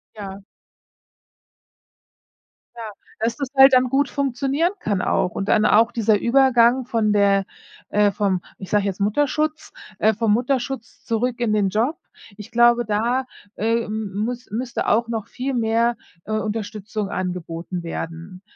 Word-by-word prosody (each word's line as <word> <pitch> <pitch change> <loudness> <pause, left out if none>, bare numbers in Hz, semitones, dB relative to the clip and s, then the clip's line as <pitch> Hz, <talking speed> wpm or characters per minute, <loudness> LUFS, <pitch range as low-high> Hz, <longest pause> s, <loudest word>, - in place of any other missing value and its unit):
Ja. 195 -2 -7 2.4
Ja, 225 -2 -7 0.3
dass 230 +1 0
das 280 -3 -3
halt 270 0 +8
dann 255 0 +5
gut 275 +2 +1
funktionieren 280 +5 0
kann 200 - -1
auch 180 - 0
und 195 - -4
dann 215 -1 +4
auch 230 +2 +4
dieser 220 -3 +2
Übergang 250 -1 +4
von 225 -3 0
der 200 -1 +3 0.4
äh, 205 0 +3
vom 195 -3 0 0.2
ich 190 - -8
sage 205 -1 +2
jetzt 195 -2 -3
Mutterschutz 290 +8 0 0.3
äh, 220 +1 +3
vom 220 -1 +1
Mutterschutz 255 0 -2
zurück 245 +2 -1
in 230 -3 +1
den 200 -2 +2
Job, 240 - 0 0.4
ich 210 +2 -11
glaube, 240 0 +4
da, 235 +5 0 0.3
äh, 230 +2 0
m 215 -1 -4
m 205 +2 -2
müss 245 0 -5
müsste 240 +2 -3
auch 230 +2 +2
noch 225 -2 -4
viel 265 +2 -4
mehr, 230 0 +1 0.3
äh, - - -7
Unterstützung 215 -1 -3
angeboten 180 -1 -4
werden. 165 +2 -7
225 Hz, 150 wpm, -22 LUFS, 205-245 Hz, 2.4 s, halt